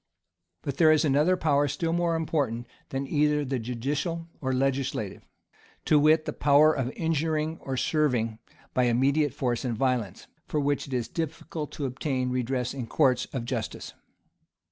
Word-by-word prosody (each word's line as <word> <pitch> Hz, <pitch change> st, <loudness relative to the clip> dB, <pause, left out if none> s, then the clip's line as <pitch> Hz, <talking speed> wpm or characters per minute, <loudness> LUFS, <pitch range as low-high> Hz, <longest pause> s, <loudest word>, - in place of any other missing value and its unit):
But 140 Hz, -1 st, -4 dB
there 160 Hz, -2 st, +6 dB
is 155 Hz, 0 st, +4 dB
another 150 Hz, +6 st, +3 dB
power 145 Hz, -3 st, +2 dB
still 165 Hz, +4 st, -1 dB
more 170 Hz, -1 st, +1 dB
important 145 Hz, -7 st, -1 dB, 0.2 s
than 135 Hz, +1 st, -2 dB
either 150 Hz, 0 st, +1 dB
the 130 Hz, -1 st, -2 dB
judicial 140 Hz, +8 st, -3 dB
or 130 Hz, -2 st, -1 dB
legislative; 135 Hz, +1 st, -1 dB, 0.6 s
to 150 Hz, -, +5 dB
wit, 155 Hz, +1 st, +4 dB
the -, -, -3 dB
power 150 Hz, +2 st, +5 dB
of 130 Hz, -3 st, -2 dB
injuring 160 Hz, 0 st, -1 dB
or 135 Hz, -1 st, -4 dB
serving 125 Hz, -8 st, +1 dB, 0.3 s
by 125 Hz, -, +3 dB
immediate 135 Hz, +5 st, +2 dB
force 125 Hz, -4 st, -1 dB
and 120 Hz, -4 st, -2 dB
violence, 125 Hz, -6 st, -1 dB, 0.2 s
for 150 Hz, -, -1 dB
which 145 Hz, 0 st, 0 dB
it 135 Hz, -, -7 dB
is 120 Hz, -2 st, -1 dB
difficult 160 Hz, 0 st, -4 dB
to 145 Hz, -, -3 dB
obtain 130 Hz, -1 st, -2 dB
redress 125 Hz, 0 st, -1 dB
in 130 Hz, -4 st, -5 dB
courts 130 Hz, -1 st, +2 dB
of 125 Hz, -4 st, -4 dB
justice. 120 Hz, -3 st, -4 dB
140 Hz, 160 wpm, -27 LUFS, 125-155 Hz, 0.6 s, there